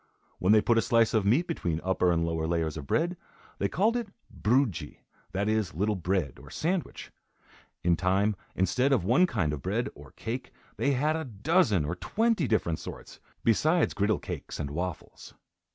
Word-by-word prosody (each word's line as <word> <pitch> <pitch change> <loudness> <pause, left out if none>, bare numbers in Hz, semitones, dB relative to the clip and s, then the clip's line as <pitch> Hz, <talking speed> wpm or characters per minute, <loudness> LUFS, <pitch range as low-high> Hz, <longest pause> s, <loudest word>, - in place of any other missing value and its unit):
When 90 - +3
they 110 0 +6
put 115 -1 +3
a - - +3
slice 115 -3 +3
of 105 -3 +2
meat 135 +12 +3
between 85 - -2
upper 90 -1 +2
and 85 -1 +1
lower 80 -1 -1
layers 80 -2 -1
of 70 -3 -7
bread, 175 - 0 0.4
they - - +1
called 220 +5 +2
it 235 -4 -2 0.3
"broodje," 120 - 0 0.3
that 100 +2 -1
is, 110 -6 0
little 105 +5 +1
bread; 90 -4 -1
or, - - -13
sandwich. 175 +2 -3 0.7
In 85 -1 +4
time, 95 +4 +1 0.2
instead 125 +10 +2
of 120 - +2
one 130 - +4
kind 90 - 0
of 70 - -5
bread, - - -1
or 75 -1 -13
cake, 120 +3 -5 0.3
they 140 - +2
had 150 +4 +1
a 160 - -2
dozen 115 - +2
or 80 - -2
twenty 220 - +1
different 85 -8 0
sorts, - - -9 0.2
besides 155 - +3
griddle 105 +2 +1
cakes - - -7
and 70 - -3
waffles. 85 +2 -6
105 Hz, 180 wpm, -28 LUFS, 85-140 Hz, 0.7 s, they